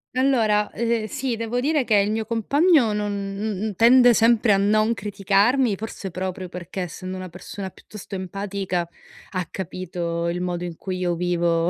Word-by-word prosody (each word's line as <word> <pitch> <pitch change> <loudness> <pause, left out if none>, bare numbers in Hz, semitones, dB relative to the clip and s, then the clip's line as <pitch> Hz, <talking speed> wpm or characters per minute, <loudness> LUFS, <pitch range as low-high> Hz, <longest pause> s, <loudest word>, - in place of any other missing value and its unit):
Allora, 225 -6 +2
eh, 230 -1 0
sì, 265 -2 -2
devo 230 +2 -2
dire 295 +2 +1
che 225 -3 +2
il 200 0 +3
mio 220 +1 -1
compagno 265 - +3
non 210 0 -1 0.6
n 210 - -5
tende 245 +2 +7
sempre 230 -1 +4
a - - +4
non 215 +3 +3
criticarmi, 205 +4 +2
forse 210 -1 -6
proprio 185 +1 -4
perché, 180 +2 -6
essendo 185 +2 -5
una 185 0 -6
persona 190 +3 -7
piuttosto 200 +1 -10
empatica, 190 -1 -3 0.4
ha 185 -2 -2
capito 170 -2 -3
il 175 +1 -2
modo 180 -1 -2
in 175 -2 -5
cui 185 -1 -4
io 180 -1 0
vivo 170 -1 +1
200 Hz, 165 wpm, -23 LUFS, 180-230 Hz, 0.6 s, tende